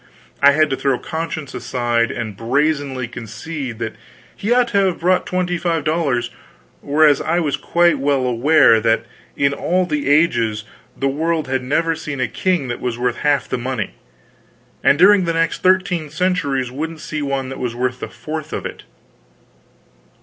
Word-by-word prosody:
I 140 0 +7
had 155 0 +2
to - - +1
throw 135 -1 0
conscience 160 -2 -5
aside, 120 -1 0
and 110 -4 -5
brazenly 135 +2 0
concede 120 +3 -6
that 115 -1 -4 0.4
he 210 - -3
ought 245 0 +3
to 200 -3 +3
have 180 - -2
brought 180 +2 +2
twenty 180 -1 -1
five 165 -3 -1
dollars; 140 -7 0 0.5
whereas 145 0 +4
I 170 +2 +1
was 150 -5 0
quite 170 -4 +2
well 135 -1 +1
aware 125 -1 +5
that 115 0 +1 0.3
in 140 0 +2
all 180 +5 0
the 150 -4 -2
ages, 115 -9 +2 0.3
the 135 - 0
world 160 +3 -1
had 130 0 -1
never 165 +6 0
seen 155 -4 -6
a 130 - +1
king 170 +3 -1
that 120 - -5
was 120 -2 -2
worth 125 -1 -1
half 145 -3 +1
the - - -2
money, 125 -3 -3 0.9
and 140 - +5
during 190 +2 +6
the 165 - 0
next 165 0 0
thirteen 185 -4 +2
centuries 150 -6 -1
wouldn't 160 +4 -5
see 155 -1 -4
one 135 -2 -2
that 135 - -7
was 120 -2 -3
worth 125 +1 -2
the - - -6
fourth 155 0 -6
of - - -4
it. - - -6
145 Hz, 170 wpm, -19 LUFS, 125-165 Hz, 0.9 s, I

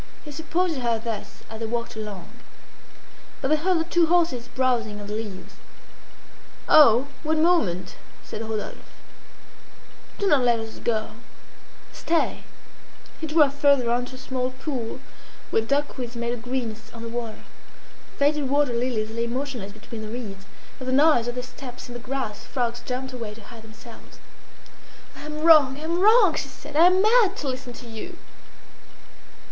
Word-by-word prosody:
He 300 - -7
supported 325 +2 -1
her 235 -3 +1
thus 225 -2 -6
as 220 0 -8
they 225 - -3
walked 235 0 -3
along. 210 -5 -6 1.1
But 265 - -1
they 310 - +5
heard 350 +4 +2
the - - +1
two 340 0 +2
horses 325 -8 +2
browsing 240 -5 0
on 205 - -8
the 210 - -5
leaves. 210 -4 -6 1.1
"Oh! 260 -4 +7 0.2
one 315 0 +1
moment!" 215 - +1 0.3
said 215 - -6
Rodolphe. 220 -1 -4 1.4
"Do 405 - -1
not 295 -9 +4
let 240 -2 +3
us 225 0 -7
go! 220 -2 -1 0.8
Stay!" 330 0 0 0.7
He 320 - -4
drew 310 0 +6
her 280 - +1
farther 280 -4 +3
on 245 +1 +1
to 255 - -10
a - - -10
small 255 -1 -2
pool 260 -3 -5 0.5
where - - +3
duckweeds 255 -1 -2
made 235 0 -2
a - - -1
greenness 235 -2 -4
on 230 - -8
the - - -5
water. 230 -1 -5 0.7
Faded 290 -1 +2
water 285 -2 +2
lilies 235 -3 -1
lay 230 +1 -2
motionless 245 -5 -4
between 220 +1 -9
the 215 - -6
reeds. 210 -5 -7 0.3
At 255 - -7
the 260 - 0
noise 280 -4 +5
of 240 - -3
their 250 - -3
steps 250 0 -9
in - - -7
the 240 - -6
grass, 255 -4 -4
frogs 240 -2 -2
jumped 255 +1 -5
away 225 -4 -6
to 225 - -13
hide 230 +1 -12
themselves. 225 +1 -14 1.0
"I 285 +2 -9
am 300 0 -5
wrong! 305 -5 +6
I - - -9
am 335 +2 -1
wrong!" 420 -2 +6
she 285 - -3
said. 285 +2 -11
"I 330 +3 +8
am 370 +2 +4
mad 430 -3 +4
to 290 - -4
listen 255 -1 -4
to 240 0 -11
you!" 225 -1 -8
250 Hz, 170 wpm, -25 LUFS, 230-295 Hz, 1.4 s, I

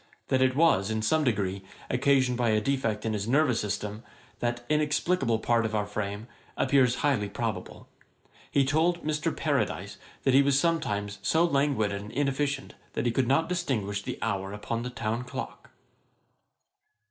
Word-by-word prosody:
That 130 - +2
it 130 0 +3
was, 135 - +3
in 110 0 -1
some 155 +7 +2
degree, 100 -6 0 0.3
occasioned 130 -1 +2
by 120 -1 +1
a 110 0 +3
defect 115 -3 -1
in 110 - 0
his 105 0 -2
nervous 130 -2 +3
system, 105 +1 -3 0.4
that 120 0 -2
inexplicable 150 -4 +1
part 115 +1 +1
of 110 0 -2
our 105 -1 +1
frame, 105 +1 -4 0.3
appears 130 -3 +3
highly 115 -8 +1
probable. - - -4 0.6
He 140 -1 +3
told 165 +5 +1
Mr. 155 +1 0
Paradise 105 - -1 0.3
that 135 - +3
he 135 - +7
was 140 -1 +3
sometimes 105 -12 -1
so 160 +1 +3
languid 140 -9 +1
and 100 +1 -5
inefficient, 140 0 -1 0.2
that - - -2
he 120 - +2
could 125 +1 +1
not 140 +5 +3
distinguish 115 - -1
the - - -5
hour 95 -3 -2
upon 105 +3 -3
the 125 - -4
town 115 0 -3
clock. 125 - -7
125 Hz, 160 wpm, -28 LUFS, 105-140 Hz, 0.6 s, he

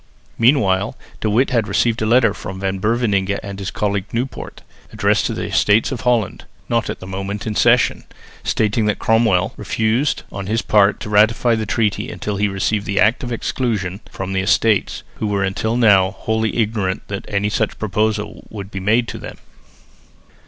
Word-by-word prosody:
Meanwhile 115 -4 +2 0.2
De 110 - -1
Witt 125 +6 +2
had 115 -4 +1
received 110 +3 +1
a 110 - +1
letter 115 -2 +4
from 95 -1 -7
Van 95 0 -2
Beverningh 100 -3 +1
and 100 -1 -7
his 100 0 -3
colleague 100 -1 -2
Nieuwpoort 125 +3 -5 0.3
addressed - - +1
to - - -3
the - - -3
Estates 105 +5 +2
of 130 - -4
Holland 120 -5 0 0.2
(not 115 -2 0
at - - -4
the - - -7
moment 100 +2 -5
in 110 - -2
session) - - +3 0.4
stating 105 0 +1
that 105 - +1
Cromwell 110 -5 +2
refused 110 +7 0
on 100 -1 -6
his 110 +2 0
part 100 -1 +3
to - - -5
ratify 110 +3 +4
the 110 -2 -1
treaty 110 -2 0
until 105 -1 -4
he 105 +1 +2
received 100 +1 -1
the 100 - 0
Act 115 +5 +3
of 125 - -4
Exclusion 105 -6 -2
from 95 0 -5
the 95 - +1
Estates, 105 +1 +1
who 110 - -2
were 100 -1 0
until 110 +4 -1
now 100 -6 +5
wholly 110 +3 -2
ignorant 105 -4 -1
that 100 -1 -5
any 100 0 0
such 110 0 -1
proposal 105 +1 -2
would 100 -2 -8
be 95 - -4
made 110 +5 +2
to - - -6
them. - - -9
105 Hz, 180 wpm, -19 LUFS, 100-115 Hz, 0.4 s, now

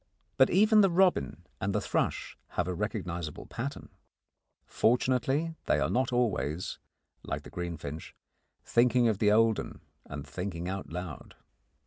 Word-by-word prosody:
But 130 - +5
even 215 +3 +5
the 195 - +5
robin 180 - +2 0.2
and 100 +1 -1
the - - +3
thrush - - -1 0.2
have 90 - +1
a 90 - -1
recognisable 90 -5 -4
pattern. 135 +4 -5 0.8
Fortunately, 130 +6 +1
they 75 - +3
are 70 +4 0
not 130 +5 +1
always, 95 -9 -1 0.4
like - - -4
the - - -12
greenfinch, 80 -3 -6 0.5
thinking 120 0 +4
of 110 -3 +1
the 105 -2 +4
old 110 0 +4
'un - - -7 0.3
and 70 0 -7
thinking 90 +3 -5
out 95 +1 -4
loud. 90 +2 -7
105 Hz, 140 wpm, -30 LUFS, 85-125 Hz, 0.8 s, But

